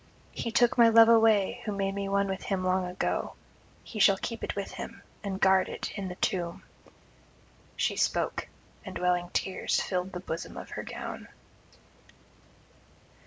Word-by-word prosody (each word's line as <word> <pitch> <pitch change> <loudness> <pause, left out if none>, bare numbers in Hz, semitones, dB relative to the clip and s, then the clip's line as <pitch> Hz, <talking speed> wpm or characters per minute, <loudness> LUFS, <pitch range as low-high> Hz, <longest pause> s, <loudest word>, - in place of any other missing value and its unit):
He 230 - -4
took 240 +1 +3
my 230 -1 +8
love 225 0 +8
away 220 -4 +4
who 215 - -2
made 195 -1 -1
me 200 0 -3
one 200 0 +2
with 190 0 -3
him 190 -2 -2
long 185 0 +1
ago; 180 +1 -2 0.5
he 220 - -8
shall 195 -1 +6
keep 230 +3 -5
it - - -3
with 200 -1 -4
him, - - -8 0.2
and 195 -2 -3
guard 190 -1 +4
it - - -5
in 200 -2 -4
the 180 - -6
tomb.' 175 -2 -2 1.1
She - - 0
spoke, - - 0 0.4
and - - -6
welling 180 0 +1
tears 190 - 0
filled 185 0 -2
the 180 - -4
bosom 165 -2 -6
of - - -8
her - - -4
gown. - - -7
195 Hz, 165 wpm, -29 LUFS, 185-210 Hz, 1.1 s, my